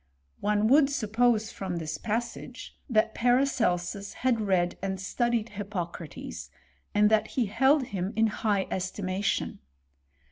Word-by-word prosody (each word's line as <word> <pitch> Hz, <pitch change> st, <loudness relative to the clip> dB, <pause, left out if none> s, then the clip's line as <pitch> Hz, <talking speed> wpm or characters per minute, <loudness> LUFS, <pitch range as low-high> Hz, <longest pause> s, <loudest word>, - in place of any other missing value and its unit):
One 210 Hz, 0 st, +1 dB
would 275 Hz, +3 st, +6 dB
sup 225 Hz, -7 st, -3 dB
pose, 225 Hz, -2 st, +3 dB
from 185 Hz, -2 st, -4 dB
this 155 Hz, -2 st, -4 dB
passage, 230 Hz, +2 st, -4 dB
that 220 Hz, -2 st, +2 dB
Paracelsus 230 Hz, -7 st, +1 dB
had 245 Hz, -3 st, +1 dB
read 185 Hz, -4 st, +1 dB
and 190 Hz, 0 st, -2 dB
studied 235 Hz, +3 st, 0 dB
Hippocrates, 185 Hz, -6 st, -6 dB, 0.5 s
and 210 Hz, +1 st, +5 dB
that 220 Hz, -1 st, +3 dB
he 250 Hz, -, 0 dB
held 265 Hz, +7 st, +3 dB
him 195 Hz, -5 st, -3 dB
in 225 Hz, +1 st, +4 dB
high 210 Hz, -2 st, 0 dB
es 185 Hz, 0 st, -1 dB
timation. 195 Hz, 0 st, -2 dB
210 Hz, 135 wpm, -28 LUFS, 190-235 Hz, 0.5 s, would